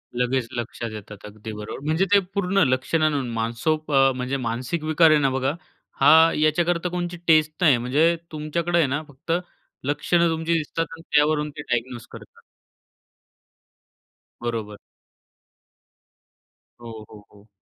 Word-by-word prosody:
लगेच 125 0 0
लक्षात 120 -1 -5
येतात. 105 -1 -10
अगदी 105 +1 -9
बरोबर. 105 +3 -7
म्हणजे 160 +5 +1
ते 200 - +7
पूर्ण 195 0 +2
लक्षणानं 135 +1 0
मानसोक 120 +8 -2
अ, 135 -1 +5
म्हणजे 130 +2 -2
मानसिक 125 +8 -3
विकार 155 +1 +4
आहे 155 - +5
ना 135 -2 +2
बघा 135 +1 -1 0.5
हा 140 +2 +7 0.3
याच्याकरता 170 +3 +1
कोणची 175 0 -4
टेस्ट 155 -1 +4
नाही. 150 -8 +5
म्हणजे 145 +8 +2 0.2
तुमच्याकडे 165 +3 -2
आहे 160 - +3
ना 140 +3 -2
फक्त 145 +4 -8 0.5
लक्षणं 170 +4 +1
तुमची 165 +1 -1
दिसतात 165 +1 -1
आणि 165 0 -10
त्यावरून 150 0 +3
ते - - -4
डायग्नोज 120 0 -2
करतात. - - -13 2.0
बरोबर. 110 -3 -4 2.0
हो, 115 -2 -9
हो, 105 -1 -14
हो. 105 +1 -20
145 Hz, 135 wpm, -23 LUFS, 120-160 Hz, 2.0 s, ते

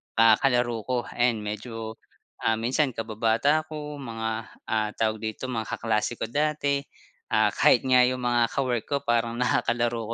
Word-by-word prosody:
ah, 115 -1 +7
kalaro 120 -3 +1
ko, 125 -1 0
ayan 120 -3 +1
medyo 110 +1 -6 0.4
ah, 115 0 +3
minsan 130 +4 +1
kababata 115 +8 +1
ko, 150 -2 -7
mga 115 -3 -4 0.4
ah, 110 -1 0
tawag 110 -1 0
dito, 110 +4 -4
mga 115 -2 -3
kaklase 110 +1 -1
ko - - -2
dati. 145 -1 +1 0.5
Ah, - - +3
kahit - - +4
nga 125 -1 +5
yung 130 -1 -2
mga 120 -1 +3
ka-work 125 -4 -1
ko 140 - 0
parang 120 -1 +1
nakakalaro 120 -2 0
120 Hz, 155 wpm, -26 LUFS, 115-130 Hz, 0.5 s, ah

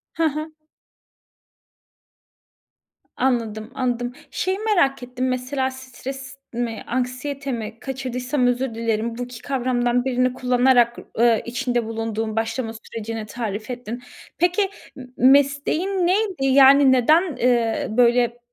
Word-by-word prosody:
Ha 330 -1 +2
ha. 310 +1 -4 2.7
Anladım, 230 -3 -1
anladım. 245 -2 -2 0.2
Şeyi 375 +1 -1
merak 355 - +1
ettim 250 +1 -3
mesela 260 +1 -1
stres 265 +1 -8
mi 230 -1 -3
anksiyete 255 +3 -3
mi 230 -1 -5
kaçırdıysam 255 0 -2
özür 245 -1 -1
dilerim. 230 0 -1
Bu 245 - -3
2 245 -2 -9
kavramdan 245 -2 0
birini 255 -1 +1
kullanarak, 250 -1 +3 0.2
ııı, 235 -1 +4
içinde 245 -1 -1
bulunduğun 225 -1 -3
başlama 225 +1 -2
sürecini 225 0 -6
tarif 215 0 -5
ettin. 245 -1 -6 0.3
Peki 355 +4 +2 0.3
m 260 - -9
m 255 - +5
mesleğin 285 +6 +2
neydi? 375 -4 +1
Yani, 270 0 +7
neden, 280 +7 +5
ııı, 240 - 0
böyle 240 0 +4
b 240 - -23
250 Hz, 120 wpm, -22 LUFS, 235-270 Hz, 2.7 s, Yani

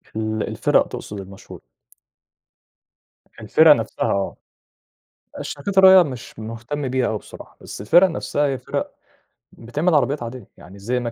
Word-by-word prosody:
ال 110 0 -2
الفِرَق - - +1
تقصد 105 -1 -8
المشهورة. 95 0 -12 1.8
الفِرَق 155 +9 +5
نفْسها 115 -1 -3
آه، 100 -1 -2 1.0
الشركات 195 +7 -5
الراعية 190 -1 +8
مش 125 -6 -9
مهتم 115 +6 -5
بيها 130 -1 0
أوي 110 - -2
بصراحة، - - -14
بس - - -9
الفِرَق 175 - +5
نفْسها 150 -3 -2
هي 135 -1 -2
فِرَق - - -4 0.6
بتعمل 150 +9 -2
عربيات 140 -1 +1
عادية، 115 -2 -8
يعني 90 +4 -14
زي 125 +5 -2
Mercedes 120 -1 -4
120 Hz, 135 wpm, -21 LUFS, 110-145 Hz, 1.8 s, الراعية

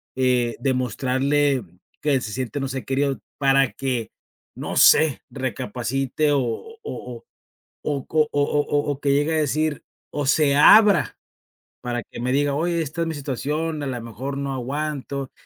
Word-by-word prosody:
eh, 125 -2 +1
demostrarle 130 +2 +1 0.4
que 140 -3 +2
se 105 - -5
siente, 130 +4 -3
no 135 - -1
sé, 130 0 -5
querido 135 0 0 0.2
para 135 -1 +3
que, 125 -5 -3 0.4
no - - -4
sé, 155 -5 +6
recapacite 130 +3 -2
o 140 - +3
o 285 - -5
o 125 - -7 0.6
o 140 -3 -3
co 155 -1 +2
o 145 - +1
o 145 +1 +1
o 145 0 0
o 140 - -8
que 140 - 0
llegue 145 +3 +2
a - - +2
decir, 155 0 0 0.3
o 145 -1 -2
se 145 0 +3
abra 205 +7 +6 0.6
para 120 -1 -3
que - - -11
me 125 +1 -1
diga: 145 0 +2
"Oye, 170 +2 0
esta 155 +3 -5
es 165 - 0
mi 165 - -2
situación, 150 +3 -3
a - - -3
lo 125 -3 -4
mejor, 125 +5 -5
no 140 -1 -3
aguanto" 140 +1 -4
140 Hz, 165 wpm, -23 LUFS, 130-150 Hz, 0.6 s, sé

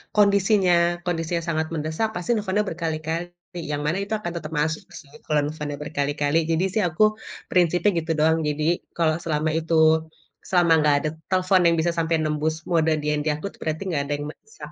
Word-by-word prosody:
kondisinya 200 -2 +4 0.3
kondisinya 170 -1 -1
sangat 160 -1 0
mendesak 160 +8 -1
pasti 180 +3 -5
nelpon 205 0 0
berkali-kali 165 +1 -3 0.4
yang 145 0 -2
mana 170 +5 0
itu 200 - -10
akan 175 -5 -4
tetap 155 -1 -7
masuk 155 +1 -1 0.2
sih 145 -2 -17
kalau 150 -1 +2
misalnya 150 -2 -5
berkali-kali, 145 +1 -1
jadi 165 +2 +1
sih 215 - +2
aku 170 +6 +1 0.5
prinsipnya 180 +2 +3
gitu 160 - -3
doang, 160 +1 +4
jadi 150 +1 -1 0.3
kalau 160 -2 +2
selama 155 -1 0
itu 165 +1 -4 0.7
selama 175 -2 +3
gak 145 -1 +5
ada 155 - 0 0.2
telpon 185 0 +3
yang 170 - +4
bisa 170 +2 +1
sampai 165 0 +1
nembus 155 +1 0
mode 160 -2 +2
DND 150 0 -1
aku 155 - -8
tu - - -20
berarti 155 +2 -2
gak 140 - +1
ada 145 - -1
yang 145 - -5
mendesak. 445 - -12
160 Hz, 180 wpm, -24 LUFS, 155-175 Hz, 0.7 s, gak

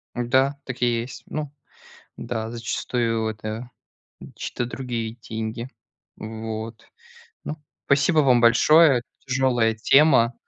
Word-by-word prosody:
Да, 130 +3 +2
так 130 -1 -7
и - - +5
есть. 120 +3 -8
Ну 150 -2 -5 0.6
да, 110 -2 -4
зачастую 115 -1 -2
это 110 +3 -6 0.7
чьи-то 120 - -4
другие 120 -3 -4
деньги. 110 +1 -5 0.5
Вот. 110 +1 -7 0.6
Ну, 150 - -4 0.3
спасибо 145 +4 +3
вам 130 -4 +5
большое. 135 +4 +6 0.2
Тяжелая 125 -3 +2
тема, 130 0 +4
120 Hz, 105 wpm, -23 LUFS, 115-130 Hz, 0.7 s, большое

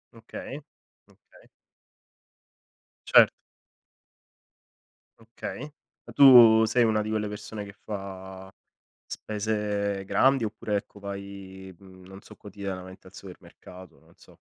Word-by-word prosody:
Okay. 115 +5 -9 0.5
Okay. - - -23 1.6
Certo. - - +6 1.9
Okay. 115 +3 -8 0.4
Ma - - -13
tu 120 -5 +8
sei 120 +2 +2
una 110 -1 +1
di 105 - -5
quelle 110 -1 -2
persone 105 0 -7
che 100 - -12
fa 95 -2 -9 0.6
spese 105 -2 -3
grandi 135 +3 +2
oppure, 105 -1 -3
ecco, 100 0 -7
vai, 100 -1 -9
mhmm, 95 -1 -17
non 95 +1 -12
so - - -16
quotidianamente 95 -2 -9
al 95 - -22
supermercato, 90 -1 -14
non - - -24
so? - - -20
100 Hz, 110 wpm, -26 LUFS, 95-110 Hz, 1.9 s, tu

